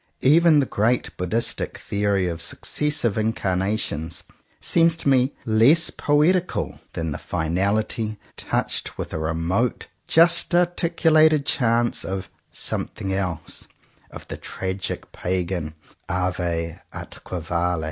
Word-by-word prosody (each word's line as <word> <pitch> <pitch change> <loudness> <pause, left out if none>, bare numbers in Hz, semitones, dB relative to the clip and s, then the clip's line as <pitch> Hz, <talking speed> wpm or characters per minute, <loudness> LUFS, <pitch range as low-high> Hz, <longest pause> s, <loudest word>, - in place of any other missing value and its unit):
Even 155 +2 +6
the 140 - +2
great 115 +2 0
Buddhistic 100 +6 -1
theory 100 -2 0
of 85 -1 -4
successive 125 - -1
incarnations 95 -6 -1 0.4
seems 165 -1 +3
to 165 - -4
me 130 0 +3
less 120 +9 +4
poetical 165 +5 +1
than 80 -1 -3
the 75 - -4
finality, 100 +6 -1 0.2
touched - - -2
with - - -5
a - - -2
remote 85 +9 -1 0.2
just 170 +1 +5
articulated 165 -4 +3
chance 120 -3 +1
of 95 -1 -5 0.2
'^something 95 0 -3
else," 90 -5 -4 0.4
of - - -11
the - - -5
tragic 95 0 -4
pagan 90 -3 -2 0.3
^'ave 85 -2 -1
atque 90 - -7
vale!'' 85 +1 0
105 Hz, 110 wpm, -23 LUFS, 90-145 Hz, 0.4 s, Even